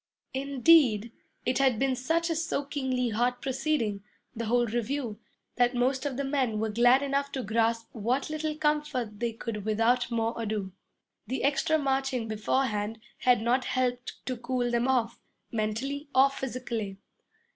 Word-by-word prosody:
Indeed, 265 Hz, -4 st, +4 dB, 0.3 s
it 250 Hz, +1 st, +1 dB
had 265 Hz, -4 st, +3 dB
been 265 Hz, +2 st, +1 dB
such 330 Hz, +6 st, 0 dB
a -, -, 0 dB
soakingly 275 Hz, -6 st, -1 dB
hot 245 Hz, +3 st, 0 dB
proceeding 255 Hz, -6 st, -1 dB, 0.3 s
the 230 Hz, 0 st, -3 dB
whole 240 Hz, +2 st, +3 dB
review 235 Hz, 0 st, -2 dB, 0.4 s
that 245 Hz, 0 st, +3 dB
most 260 Hz, +3 st, +1 dB
of 265 Hz, -3 st, -4 dB
the 280 Hz, -, -1 dB
men 265 Hz, -6 st, 0 dB
were 220 Hz, 0 st, -1 dB
glad 245 Hz, +5 st, +5 dB
enough 280 Hz, 0 st, -1 dB
to 260 Hz, -, -2 dB
grasp 225 Hz, +2 st, +1 dB
what 245 Hz, +5 st, 0 dB
little 310 Hz, 0 st, -2 dB
comfort 295 Hz, -8 st, -1 dB
they 235 Hz, 0 st, 0 dB
could 225 Hz, -2 st, -5 dB
without 225 Hz, +4 st, +2 dB
more 230 Hz, -1 st, 0 dB
ado. 210 Hz, -3 st, -2 dB, 0.6 s
The 260 Hz, +4 st, -2 dB
extra 290 Hz, +3 st, +2 dB
marching 270 Hz, -4 st, 0 dB
beforehand 215 Hz, 0 st, -1 dB, 0.2 s
had 245 Hz, -3 st, +3 dB
not 250 Hz, +2 st, +2 dB
helped 250 Hz, -1 st, -2 dB
to 255 Hz, -2 st, -3 dB
cool 245 Hz, 0 st, -1 dB
them 240 Hz, +1 st, +1 dB
off, 245 Hz, -3 st, +1 dB, 0.3 s
mentally 240 Hz, +7 st, -2 dB
or 270 Hz, +1 st, +6 dB
physically. 235 Hz, -7 st, -4 dB
250 Hz, 150 wpm, -28 LUFS, 225-275 Hz, 0.6 s, or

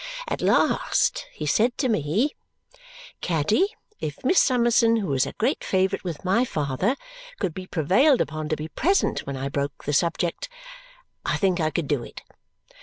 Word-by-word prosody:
At -, -, -3 dB
last -, -, +2 dB
he 155 Hz, -, -6 dB
said 225 Hz, -, +2 dB
to 265 Hz, -, +1 dB
me, 215 Hz, -, +1 dB, 0.9 s
'Caddy, 180 Hz, -, +2 dB, 0.3 s
if 145 Hz, -2 st, -5 dB
Miss 365 Hz, +8 st, +5 dB
Summerson, 235 Hz, -3 st, +4 dB
who 195 Hz, -10 st, -1 dB
is 135 Hz, 0 st, +2 dB
a -, -, -6 dB
great -, -, -1 dB
favourite 190 Hz, +1 st, 0 dB
with 175 Hz, -2 st, -6 dB
my 195 Hz, +7 st, +3 dB
father, 150 Hz, -, -1 dB, 0.4 s
could 175 Hz, -, -1 dB
be 185 Hz, +1 st, -7 dB
prevailed 235 Hz, -, +3 dB
upon 155 Hz, -1 st, -2 dB
to 155 Hz, -, +1 dB
be 155 Hz, +1 st, -6 dB
present 380 Hz, -, 0 dB
when 140 Hz, -1 st, -4 dB
I 135 Hz, +1 st, -3 dB
broke 140 Hz, +1 st, -3 dB
the 145 Hz, -, -2 dB
subject, 170 Hz, -, 0 dB, 0.7 s
I -, -, 0 dB
think 190 Hz, -3 st, +1 dB
I 155 Hz, -, +2 dB
could 155 Hz, 0 st, -2 dB
do 135 Hz, -4 st, 0 dB
it.' -, -, -11 dB
175 Hz, 170 wpm, -24 LUFS, 150-230 Hz, 0.9 s, Miss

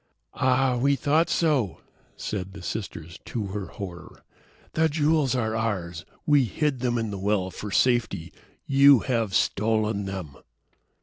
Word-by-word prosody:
"Ah, 130 Hz, 0 st, +2 dB
we 140 Hz, +3 st, +3 dB
thought 155 Hz, +5 st, +2 dB
so," 140 Hz, -, +1 dB, 0.4 s
said 95 Hz, -2 st, -4 dB
the 100 Hz, -, -9 dB
sisters, 85 Hz, -3 st, -6 dB
to 110 Hz, -4 st, -3 dB
her 100 Hz, 0 st, -4 dB
horror. 90 Hz, -3 st, -9 dB, 0.5 s
"The 160 Hz, 0 st, +2 dB
jewels 150 Hz, -3 st, +2 dB
are 110 Hz, -3 st, -1 dB
ours. 90 Hz, -6 st, -3 dB, 0.2 s
We 145 Hz, -3 st, +4 dB
hid 140 Hz, +4 st, -1 dB
them 120 Hz, -1 st, 0 dB
in 115 Hz, -2 st, -2 dB
the 100 Hz, -, -5 dB
well 95 Hz, -1 st, 0 dB
for 105 Hz, +4 st, -7 dB
safety. 115 Hz, -7 st, +1 dB, 0.3 s
You 140 Hz, -2 st, +6 dB
have 115 Hz, -7 st, -1 dB
stolen 110 Hz, -1 st, +1 dB
them." 95 Hz, -7 st, -6 dB
110 Hz, 140 wpm, -26 LUFS, 95-135 Hz, 0.5 s, You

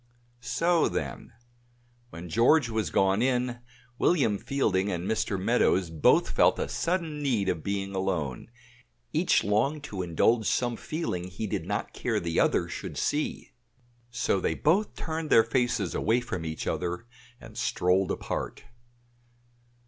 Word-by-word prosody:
So 165 Hz, +6 st, +1 dB
then; 70 Hz, -, -4 dB, 0.8 s
when 85 Hz, -2 st, -9 dB
George 120 Hz, -, +4 dB
was 110 Hz, -3 st, -1 dB
gone 95 Hz, +2 st, +2 dB
in, 125 Hz, -1 st, 0 dB, 0.4 s
William 125 Hz, -, +2 dB
Fielding 100 Hz, -8 st, 0 dB
and 90 Hz, -1 st, -3 dB
Mr. 110 Hz, -3 st, -1 dB
Meadows 95 Hz, -4 st, +2 dB
both 80 Hz, -2 st, +3 dB
felt -, -, +4 dB
a -, -, -2 dB
sudden 165 Hz, -4 st, -2 dB
need 120 Hz, -9 st, 0 dB
of 80 Hz, -, -1 dB
being 100 Hz, +2 st, -3 dB
alone; 90 Hz, -9 st, -2 dB, 0.6 s
each -, -, +3 dB
longed 135 Hz, +9 st, +1 dB
to 100 Hz, -9 st, -5 dB
indulge 100 Hz, +7 st, +2 dB
some 120 Hz, -1 st, +1 dB
feeling 115 Hz, -, -4 dB
he 90 Hz, +4 st, -5 dB
did 100 Hz, -, -3 dB
not -, -, -3 dB
care -, -, -1 dB
the 85 Hz, -1 st, -1 dB
other -, -, +2 dB
should -, -, -6 dB
see; -, -, -2 dB, 0.6 s
so 115 Hz, -4 st, 0 dB
they -, -, 0 dB
both 190 Hz, +8 st, +1 dB
turned 160 Hz, -1 st, -4 dB
their 115 Hz, -, +7 dB
faces 115 Hz, -5 st, 0 dB
away 115 Hz, +3 st, +2 dB
from 90 Hz, -9 st, -5 dB
each 80 Hz, 0 st, -4 dB
other 90 Hz, +5 st, -2 dB, 0.3 s
and -, -, -13 dB
strolled 90 Hz, +1 st, +1 dB
apart. -, -, -4 dB
110 Hz, 140 wpm, -28 LUFS, 90-125 Hz, 0.8 s, their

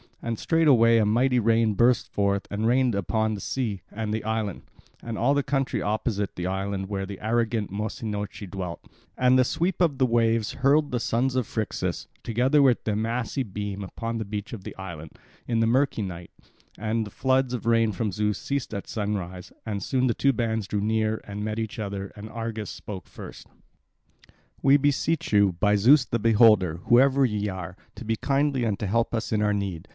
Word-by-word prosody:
And 115 Hz, -1 st, -2 dB
straightway 125 Hz, -8 st, +4 dB
a 110 Hz, -, +3 dB
mighty 125 Hz, +4 st, +3 dB
rain 115 Hz, -1 st, +3 dB
burst 120 Hz, +3 st, +3 dB
forth, 100 Hz, -1 st, 0 dB
and 105 Hz, +2 st, 0 dB
rained 125 Hz, 0 st, +3 dB
upon 110 Hz, +3 st, 0 dB
the 105 Hz, -, -4 dB
sea 110 Hz, -6 st, -2 dB
and 110 Hz, 0 st, -3 dB
the 110 Hz, -, -2 dB
island, 110 Hz, -3 st, -2 dB, 0.4 s
and 115 Hz, -2 st, -5 dB
all 135 Hz, +5 st, +3 dB
the 145 Hz, -, +2 dB
country 135 Hz, -1 st, -1 dB
opposite 105 Hz, -1 st, -2 dB
the 90 Hz, -, -4 dB
island, 95 Hz, +1 st, -3 dB
where 95 Hz, -1 st, -3 dB
the 100 Hz, -1 st, -7 dB
arrogant 110 Hz, -1 st, 0 dB
Mossynoeci 105 Hz, 0 st, -4 dB
dwelt. 90 Hz, -3 st, -6 dB, 0.3 s
And 125 Hz, 0 st, +4 dB
the 130 Hz, -, +5 dB
sweep 175 Hz, +8 st, -1 dB
of 160 Hz, -6 st, +2 dB
the 130 Hz, -, +3 dB
waves 115 Hz, -2 st, +1 dB
hurled 145 Hz, +3 st, +2 dB
the 125 Hz, -, 0 dB
sons 125 Hz, +3 st, 0 dB
of 125 Hz, -4 st, 0 dB
Phrixus, 110 Hz, -2 st, -3 dB, 0.2 s
together 125 Hz, +6 st, +2 dB
with 130 Hz, -4 st, +3 dB
their 105 Hz, -, -1 dB
massy 115 Hz, +4 st, -2 dB
beam, 100 Hz, -3 st, -4 dB
upon 115 Hz, +5 st, -4 dB
the 110 Hz, -, -3 dB
beach 105 Hz, +1 st, -5 dB
of 105 Hz, -5 st, -7 dB
the -, -, -8 dB
island, 85 Hz, -5 st, -8 dB, 0.3 s
in 115 Hz, -2 st, 0 dB
the 115 Hz, -, +3 dB
murky 130 Hz, -2 st, +1 dB
night; 90 Hz, -3 st, -7 dB, 0.5 s
and 110 Hz, +1 st, -1 dB
the -, -, -8 dB
floods 130 Hz, +1 st, +1 dB
of 115 Hz, -, -6 dB
rain 115 Hz, -1 st, +3 dB
from 105 Hz, +1 st, -2 dB
Zeus 105 Hz, +1 st, -1 dB
ceased 140 Hz, -6 st, -3 dB
at 100 Hz, -, -5 dB
sunrise, 95 Hz, -4 st, -4 dB
and 105 Hz, -3 st, -3 dB
soon 130 Hz, +6 st, 0 dB
the 120 Hz, -, +2 dB
two 140 Hz, 0 st, +2 dB
bands 110 Hz, -3 st, -1 dB
drew 105 Hz, -1 st, -1 dB
near 110 Hz, +1 st, 0 dB
and 105 Hz, 0 st, -5 dB
met 110 Hz, 0 st, -3 dB
each 110 Hz, 0 st, -4 dB
other, 100 Hz, -2 st, -4 dB
and 105 Hz, +1 st, -9 dB
Argus 115 Hz, -2 st, -5 dB
spoke 95 Hz, -4 st, -8 dB
first: -, -, -11 dB, 1.1 s
"We 135 Hz, +1 st, +6 dB
beseech 145 Hz, 0 st, 0 dB
you, 100 Hz, -2 st, +5 dB
by 105 Hz, 0 st, +3 dB
Zeus 130 Hz, +6 st, +6 dB
the 120 Hz, -, -2 dB
Beholder, 105 Hz, -6 st, +4 dB
whoever 135 Hz, +3 st, +5 dB
ye 105 Hz, -3 st, -1 dB
are, 90 Hz, -1 st, -6 dB, 0.2 s
to 125 Hz, -, -9 dB
be 115 Hz, +1 st, 0 dB
kindly 135 Hz, +1 st, 0 dB
and 105 Hz, -3 st, 0 dB
to 105 Hz, -, -2 dB
help 115 Hz, +4 st, 0 dB
us 115 Hz, -, -3 dB
in 105 Hz, -1 st, +1 dB
our 105 Hz, 0 st, +2 dB
need. 95 Hz, -3 st, -3 dB
110 Hz, 195 wpm, -26 LUFS, 100-125 Hz, 1.1 s, We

